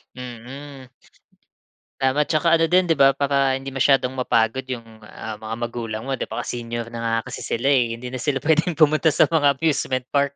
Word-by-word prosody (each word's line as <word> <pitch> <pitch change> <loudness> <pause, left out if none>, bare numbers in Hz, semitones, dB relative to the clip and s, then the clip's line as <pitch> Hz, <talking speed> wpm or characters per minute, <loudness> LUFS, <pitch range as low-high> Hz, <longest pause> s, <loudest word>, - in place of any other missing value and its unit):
Mm. 130 +2 -10 1.1
Tama, 135 +3 +2
tsaka 160 +1 +2
ano 165 - +3
din 180 +3 +4
'di 165 -4 0
ba, 135 0 +6
para 140 -1 +1
hindi 135 0 -6
masyadong 135 -1 +2
mapagod 125 0 0
yung, 125 -3 -5 0.2
ah, 110 -1 -8
mga 110 +1 -5
magulang 115 -2 -5
mo 135 0 -3
'di - - -3
ba, - - -4
kasi 120 - -4
senior 120 0 -5
na 115 - -6
nga 115 0 0 0.2
kasi - - -6
sila 135 +5 0
eh. 120 -4 +2
Hindi 125 +1 -8
na 130 - -5
sila 135 -1 -1
puwedeng 160 +2 +2
pumunta 155 0 +3
sa 150 - +4
mga 145 -4 +3
amusement 135 -3 0
park, 140 0 +1
130 Hz, 195 wpm, -22 LUFS, 120-145 Hz, 1.1 s, ba